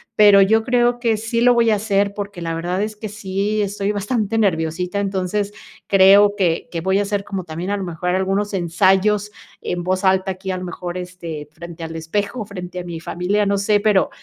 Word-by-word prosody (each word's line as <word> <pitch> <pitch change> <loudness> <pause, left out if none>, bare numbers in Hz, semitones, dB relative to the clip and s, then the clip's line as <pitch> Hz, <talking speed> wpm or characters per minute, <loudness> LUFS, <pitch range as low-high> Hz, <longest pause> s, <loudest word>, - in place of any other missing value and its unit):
pero, 205 -2 +7
yo 220 +3 +3
creo 245 0 +2
que 230 -3 +1
sí 230 +2 -2
lo 245 0 +6
voy 230 -1 +3
a - - +4
hacer 200 -1 0
porque 200 -2 -6
la 165 -1 -3
verdad, 175 +3 -2
es 215 0 -4
que 215 0 -7
sí 205 +1 -2
estoy 200 0 -2
bastante 210 +1 -1
nerviosita. 180 -1 0
Entonces 200 +1 -2 0.3
creo 200 +1 +6
que 170 -4 0
que 170 - -3
voy 190 +3 +1
a - - +2
hacer 205 0 -2
como 195 -2 -5
también 170 +2 -5
a 205 - 0
lo 195 - -4
mejor 175 0 -4
algunos 195 +3 0
ensayos 195 +3 +2 0.3
en 175 -1 -3
voz 185 +2 -1
alta, 190 0 +2
aquí 190 +1 -5
a 185 - -2
lo 180 - -6
mejor, 175 0 -6
este, 170 -4 -7
frente 170 +1 -10
al 165 0 -6
espejo, 200 +8 -3
frente 180 -3 -7
a - - -5
mi 170 -2 -6
familia, 180 +5 -1
no 200 0 +1
sé, 205 +1 +2
pero, 205 -2 +2
195 Hz, 210 wpm, -20 LUFS, 180-210 Hz, 0.3 s, pero